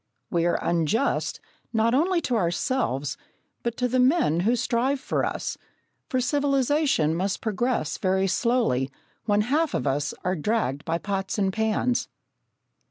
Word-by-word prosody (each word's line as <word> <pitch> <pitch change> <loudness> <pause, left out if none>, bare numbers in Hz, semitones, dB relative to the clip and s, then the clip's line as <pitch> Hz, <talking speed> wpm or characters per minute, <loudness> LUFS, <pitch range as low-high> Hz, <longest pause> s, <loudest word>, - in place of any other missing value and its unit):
We 170 -1 +2
are 175 - +2
unjust, 170 - 0 0.3
not 225 +1 +2
only 340 +6 +2
to 250 - -1
ourselves, 170 - 0 0.4
but 235 -1 -3
to 250 - +1
the 255 +1 +1
men 250 - +3
who 220 +7 +2
strive 250 +3 0
for - - -1
us, - - -3 0.5
for 260 -4 +1
civilisation 275 - +2
must 190 +4 -1
progress 225 - -1
very 190 0 +1
slowly 195 - +1 0.4
when 205 -1 +3
half 295 +8 +1
of - - -1
us 145 +1 -1
are 185 +1 0
dragged 160 - -1
by 165 0 0
pots 195 +2 -3
and 195 -2 +1
pans. 220 +3 0
220 Hz, 145 wpm, -25 LUFS, 175-255 Hz, 0.5 s, men